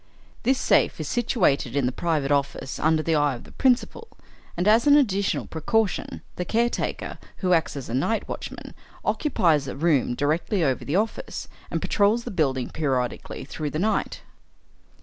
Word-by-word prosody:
This 265 +1 +2
safe - - +2
is - - -3
situated 180 - +1
in 140 -3 +2
the 125 - +1
private 150 -1 -1
office 140 -1 -1
under 155 0 +2
the 165 - +1
eye 145 -3 +2
of 120 - -10
the - - -15
principal, 265 - +1 0.5
and, 175 +3 0
as 225 +5 +5
an 290 0 +8
additional 200 -8 +1
precaution, 200 +6 -1
the 180 - -1
caretaker, 235 +6 -1 0.3
who 180 - +4
acts 165 -3 +1
as 135 - -6
night 140 - -1
watchman, - - -7 0.3
occupies 165 - +2
a - - -5
room 145 -5 +2
directly 160 - 0
over 135 -4 0
the 145 - -2
office, 215 +3 -2 0.2
and - - -2
patrols 215 +3 +2
the - - -6
building 135 -8 0
periodically 130 -7 -2
through 150 +1 -4
the 150 - -4
night. 215 +6 -1
160 Hz, 165 wpm, -25 LUFS, 140-215 Hz, 0.5 s, an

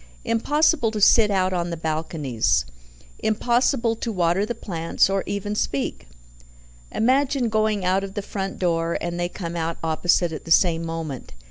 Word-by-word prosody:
Impossible 265 +3 +2
to 215 -1 -4
sit 210 +1 +6
out 185 -2 +1
on 175 -1 -1
the 170 - -4
balconies. 150 - -1 0.5
Impossible 235 +1 +1
to 230 +1 -4
water 180 +1 +1
the 240 - -3
plants, 170 -3 0
or 195 0 +1
even 205 +1 -3
speak. 140 - -2 0.8
Imagine 260 +1 +1
going 215 -3 0
out 190 +2 +2
of 195 0 -7
the 205 - -3
front 195 -1 -4
door, 170 -2 0
and 175 0 -4
they 175 0 -1
come 170 -2 -6
out 165 0 -2
opposite 165 +2 +1
at 155 - -6
the - - -11
same 165 -1 +4
moment. 165 -5 -5
185 Hz, 160 wpm, -23 LUFS, 165-220 Hz, 0.8 s, sit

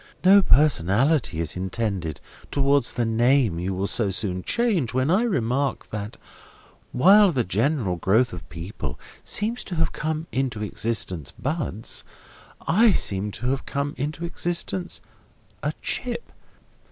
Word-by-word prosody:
No 195 +2 +7
personality 135 - +3
is 85 - -2
intended 95 -3 -3 0.3
towards 140 -2 +2
the 120 - 0
name 115 -4 +2
you 90 +2 -2
will 95 +2 -1
so 105 0 +2
soon 95 -1 -2
change, 185 - 0
when 130 +4 +2
I 190 +5 +4
remark 135 - -1
that 105 +1 -5 0.7
while 195 +8 +6
the 130 -6 0
general 110 - 0
growth 110 +7 +2
of 90 - -9
people 80 - -6 0.2
seem 220 +4 0
to 185 - -5
have 160 -1 +1
come 155 +1 -3
into 125 -5 -2
existence, 100 - -2
buds, 135 - -3 0.6
I 210 +5 +5
seem 100 - +1
to 120 +3 -3
have 135 - -3
come 140 +1 -2
into 150 +5 -4
existence 175 +1 -2 0.6
a - - -1
chip. 475 - -3
125 Hz, 135 wpm, -24 LUFS, 100-160 Hz, 0.7 s, No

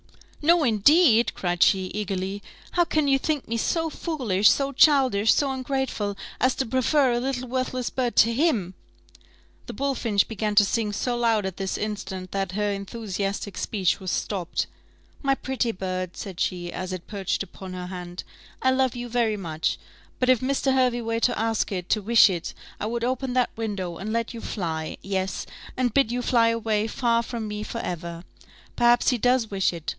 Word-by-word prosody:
"No, 335 +1 +5
indeed!" 240 - +4
cried 175 -1 -2
she, 195 - +5
eagerly: 195 -1 -3 0.3
"how 350 - +3
can 310 -3 0
you 270 -1 +4
think 300 -1 -2
me 230 - -1
so 325 +7 0
foolish, 235 - +2
so 275 0 +1
childish, 260 -7 +4
so 280 -2 +2
ungrateful, 260 -6 -2 0.2
as 255 0 +2
to 265 - -1
prefer 260 +3 +2
a 240 - +1
little 255 0 -2
worthless 255 0 -2
bird 250 -2 -1
to 230 +1 +5
him 230 - +1 0.4
" - - -29
(the - - -6
bullfinch 235 -7 0
began 215 -1 -2
to 205 0 +7
sing 215 0 0
so 240 +4 -1
loud 230 -4 +2
at 190 -2 -4
this 190 -1 -2
instant, 190 -3 -5
that 195 -2 -2
her 205 +1 0
enthusiastic 200 -1 -4
speech 190 -5 0
was 190 -2 -5
stopped). 180 -1 -2 0.6
"My 275 -1 +2
pretty 260 -3 -1
bird," 185 -3 -4
said 190 -3 -7
she, 175 -2 -2
as 185 0 -4
it 185 -2 -6
perched 200 -2 -2
upon 190 0 -10
her 180 0 -5
hand, 180 -1 -7 0.4
"I 260 - +4
love 260 -1 +1
you 245 0 -5
very 230 -3 +1
much, 160 -5 -2 0.4
but 255 - +1
if 255 -3 +5
Mr. 265 +1 +1
Hervey 250 -2 +2
were 230 0 -1
to 245 - +1
ask 225 -1 0
it, 180 -2 -3
to 215 - +2
wish 225 +2 +6
it, 175 -2 -4 0.2
I 210 - -2
would 235 +1 -2
open 255 +1 -1
that 250 -1 +2
window, 200 -6 -4
and 210 +3 -5
let 230 +2 -1
you 230 - -7
fly; 160 -5 -4
yes, 190 -1 -2 0.3
and 250 -3 +1
bid 270 -5 +3
you 245 0 -2
fly 235 -2 +4
away 225 -2 0
far 235 0 +1
from 230 -2 -5
me 210 0 -4
for 220 - -5
ever. 170 -1 -5 0.5
Perhaps 240 0 +4
he 250 - +1
does 245 -2 +2
wish 195 -1 +1
it? 170 -3 -6
225 Hz, 190 wpm, -25 LUFS, 195-255 Hz, 0.6 s, to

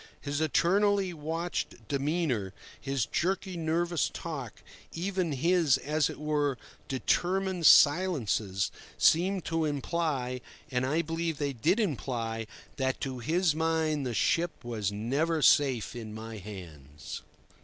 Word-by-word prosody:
His 145 +1 -3
eternally 195 +4 +2
watchful 165 +3 -3
demeanour, 140 - -1 0.2
his 135 -5 -1
jerky, 190 +1 -1
nervous 170 0 0
talk, 140 - -6 0.3
even 185 -1 -1
his, 165 -1 +3
as 150 +1 0
it - - -8
were, 150 -3 0 0.3
determined 180 +6 +1
silences, 130 - +4 0.3
seemed 185 +3 +3
to 165 -1 0
imply—and, 135 -4 -2
I 160 +5 +1
believe, 165 0 -2
they 140 -1 -1
did 165 - +1
imply—that 125 - -3
to 130 -2 -3
his 160 +6 +2
mind 160 -2 0
the 125 -3 -3
ship 170 - +1
was 110 -4 -2
never 140 +10 0
safe 130 -6 +4
in 110 -3 -7
my 110 0 -7
hands. 80 -8 -9
150 Hz, 115 wpm, -29 LUFS, 125-170 Hz, 0.3 s, silences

